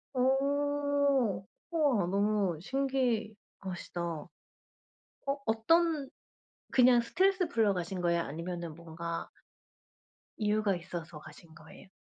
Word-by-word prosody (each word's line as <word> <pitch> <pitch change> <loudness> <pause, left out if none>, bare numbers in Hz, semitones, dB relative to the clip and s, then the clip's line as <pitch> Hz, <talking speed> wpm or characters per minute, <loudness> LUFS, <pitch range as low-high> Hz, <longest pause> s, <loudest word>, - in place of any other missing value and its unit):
어 280 -4 +2 0.3
우와 285 - +2
너무 200 -3 +1
신기하시다. 225 -8 -2
어, 165 -1 -4 1.2
어떤 300 +6 +2 0.6
그냥 250 -1 +6
스트레스 370 +7 +2
풀러 220 -7 +2
가신 180 +1 -3
거예요? 170 -1 +2
아니면은 170 +1 -5
뭔가 170 0 -5 1.1
이유가 210 -2 +1
있어서 170 -3 -7
가신 155 +2 -14
거예요? 160 +4 -14
210 Hz, 215 characters per minute, -31 LUFS, 170-270 Hz, 1.2 s, 그냥